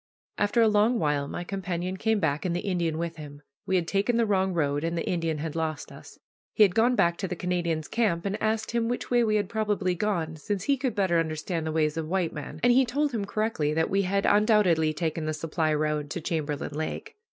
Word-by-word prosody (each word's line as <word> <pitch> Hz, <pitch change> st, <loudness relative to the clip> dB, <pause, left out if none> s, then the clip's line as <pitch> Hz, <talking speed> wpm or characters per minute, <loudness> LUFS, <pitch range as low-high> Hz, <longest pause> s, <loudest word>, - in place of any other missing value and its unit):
After 205 Hz, +3 st, +3 dB
a -, -, +5 dB
long 215 Hz, +3 st, +3 dB
while 145 Hz, -4 st, 0 dB
my 175 Hz, -, -5 dB
companion 185 Hz, -1 st, -3 dB
came 220 Hz, +2 st, +1 dB
back, 155 Hz, -3 st, 0 dB
and 175 Hz, -2 st, -1 dB
the 175 Hz, -, -1 dB
Indian 175 Hz, -5 st, -1 dB
with 165 Hz, 0 st, -4 dB
him. 145 Hz, -1 st, -10 dB, 0.2 s
We 190 Hz, -, +1 dB
had 175 Hz, -3 st, +1 dB
taken 205 Hz, +6 st, +1 dB
the 230 Hz, -, +3 dB
wrong 190 Hz, -2 st, +1 dB
road, 145 Hz, -4 st, 0 dB
and 165 Hz, +1 st, -1 dB
the 165 Hz, -, -3 dB
Indian 165 Hz, -3 st, -1 dB
had 155 Hz, +1 st, -4 dB
lost 160 Hz, -2 st, -3 dB
us. -, -, -13 dB, 0.4 s
He 215 Hz, -, +7 dB
had 195 Hz, -4 st, +4 dB
gone 235 Hz, +4 st, +3 dB
back 170 Hz, -6 st, +2 dB
to 195 Hz, -, -3 dB
the 180 Hz, -, -4 dB
Canadian's 170 Hz, -3 st, -2 dB
camp 205 Hz, -7 st, 0 dB
and 200 Hz, +2 st, -2 dB
asked 220 Hz, 0 st, 0 dB
him 235 Hz, -1 st, 0 dB
which 245 Hz, +1 st, -3 dB
way 240 Hz, -1 st, +4 dB
we 215 Hz, -2 st, +1 dB
had 205 Hz, -2 st, +1 dB
probably 210 Hz, -3 st, 0 dB
gone, 170 Hz, -4 st, -2 dB
since 195 Hz, +5 st, -3 dB
he 280 Hz, +5 st, +2 dB
could 255 Hz, -4 st, -2 dB
better 185 Hz, -5 st, +2 dB
understand 160 Hz, +1 st, -2 dB
the -, -, -1 dB
ways 155 Hz, 0 st, 0 dB
of 160 Hz, -1 st, -2 dB
white 180 Hz, -3 st, 0 dB
men, 150 Hz, +1 st, -7 dB
and 245 Hz, -, +6 dB
he 265 Hz, +2 st, +5 dB
told 285 Hz, +4 st, 0 dB
him 220 Hz, -5 st, -2 dB
correctly 200 Hz, -8 st, -1 dB
that 160 Hz, 0 st, +1 dB
we 195 Hz, +1 st, +3 dB
had 195 Hz, +1 st, 0 dB
undoubtedly 205 Hz, -7 st, +4 dB
taken 160 Hz, 0 st, -2 dB
the 155 Hz, -, -1 dB
supply 155 Hz, 0 st, -1 dB
road 150 Hz, -1 st, -1 dB
to 175 Hz, -, -4 dB
Chamberlain 150 Hz, -4 st, -3 dB
Lake. 155 Hz, +1 st, -5 dB
175 Hz, 235 wpm, -27 LUFS, 160-210 Hz, 0.4 s, He